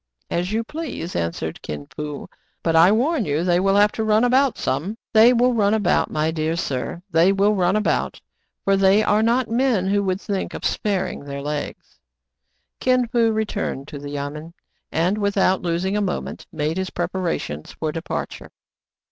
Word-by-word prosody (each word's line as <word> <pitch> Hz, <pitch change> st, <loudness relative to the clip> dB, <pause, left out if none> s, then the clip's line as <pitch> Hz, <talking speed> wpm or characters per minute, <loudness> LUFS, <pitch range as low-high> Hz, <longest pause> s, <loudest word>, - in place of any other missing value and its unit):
"As 175 Hz, +3 st, -1 dB
you 225 Hz, +2 st, 0 dB
please," 290 Hz, -, -6 dB
answered 85 Hz, 0 st, -3 dB
Kin 75 Hz, -1 st, -6 dB
Fo; 150 Hz, -1 st, -5 dB, 0.4 s
"but 165 Hz, -1 st, +1 dB
I 170 Hz, +4 st, +7 dB
warn 255 Hz, +5 st, +2 dB
you 150 Hz, -1 st, -1 dB
they 175 Hz, -1 st, +2 dB
will 195 Hz, +1 st, +2 dB
have 205 Hz, +1 st, +5 dB
to 220 Hz, -, -3 dB
run 215 Hz, +1 st, +3 dB
about 260 Hz, +1 st, +3 dB
some." 175 Hz, +12 st, -2 dB, 0.2 s
"They 225 Hz, +2 st, +7 dB
will 250 Hz, +1 st, +3 dB
run 210 Hz, -2 st, +2 dB
about, 205 Hz, -5 st, +1 dB
my 155 Hz, +1 st, 0 dB
dear 160 Hz, 0 st, -1 dB
sir; 170 Hz, +1 st, -3 dB
they 165 Hz, +4 st, +5 dB
will 200 Hz, +2 st, +3 dB
run 185 Hz, -1 st, +2 dB
about: 215 Hz, -, 0 dB, 0.5 s
for 195 Hz, -, +4 dB
they 195 Hz, +2 st, +4 dB
are 210 Hz, 0 st, +3 dB
not 235 Hz, +3 st, +2 dB
men 230 Hz, -5 st, +1 dB
who 200 Hz, 0 st, +2 dB
would 190 Hz, -1 st, -1 dB
think 200 Hz, -2 st, -3 dB
of -, -, -6 dB
sparing 200 Hz, -8 st, -1 dB
their 140 Hz, 0 st, -6 dB
legs." 150 Hz, 0 st, -5 dB, 0.8 s
Kin 255 Hz, -1 st, +2 dB
Fo 235 Hz, -2 st, +3 dB
returned 210 Hz, -10 st, -2 dB
to 145 Hz, -, -7 dB
the 145 Hz, 0 st, -7 dB
yamen, 145 Hz, +3 st, -6 dB, 0.4 s
and, 180 Hz, +6 st, +1 dB
without 200 Hz, -2 st, +2 dB
los 170 Hz, +1 st, -1 dB
ing 195 Hz, +2 st, 0 dB
a 210 Hz, -, +1 dB
moment, 190 Hz, -3 st, -4 dB
made 155 Hz, 0 st, -2 dB
his 190 Hz, 0 st, -2 dB
preparations 175 Hz, -, -3 dB
for 155 Hz, -1 st, -3 dB
departure. 165 Hz, +2 st, -5 dB
190 Hz, 180 wpm, -22 LUFS, 160-215 Hz, 0.8 s, I